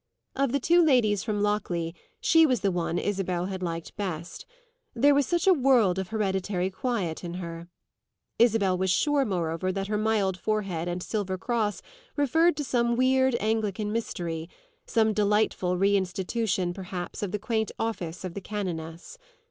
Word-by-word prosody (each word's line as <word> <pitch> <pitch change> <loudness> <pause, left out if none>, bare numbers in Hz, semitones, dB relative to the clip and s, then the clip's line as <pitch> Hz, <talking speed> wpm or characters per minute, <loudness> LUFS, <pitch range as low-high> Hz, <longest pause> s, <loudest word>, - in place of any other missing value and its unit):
Of 275 -2 +1
the 280 - +1
two 345 +6 +4
ladies 235 -9 +3
from 210 -3 -1
Lockleigh 175 -5 -1 0.3
she 325 0 +5
was 255 -6 +1
the 200 -2 +1
one 175 -1 -1
Isabel 185 -3 -1
had 190 -1 -5
liked 165 -2 -4
best; 175 -5 -5 0.5
there 285 +5 +5
was 280 -2 +2
such 345 -2 0
a 385 - +7
world 250 - +3
of 190 - -3
hereditary 190 -3 -1
quiet 190 -7 -2
in 175 0 -5
her. 170 -1 -6 0.7
Isabel 220 -5 +4
was 190 +1 0
sure 285 +9 +2
moreover 175 -2 -1
that 195 +1 -3
her 210 -1 0
mild 210 -4 +1
forehead 195 -6 -2
and 175 0 -3
silver 195 -4 -2
cross 215 0 -1 0.3
referred 315 +4 +3
to 295 - -1
some 235 -3 +1
weird 260 0 +3
Anglican 215 -1 -1
mystery 170 -7 -3 0.4
some 220 -2 +2
delightful 210 -3 +1
reinstitution 190 0 0
perhaps 180 -1 -6
of 200 -3 -2
the 210 - -1
quaint 220 0 -1
office 185 -7 -3
of 185 -2 -5
the 200 - -6
canoness. 175 - -5
205 Hz, 160 wpm, -27 LUFS, 180-230 Hz, 0.7 s, a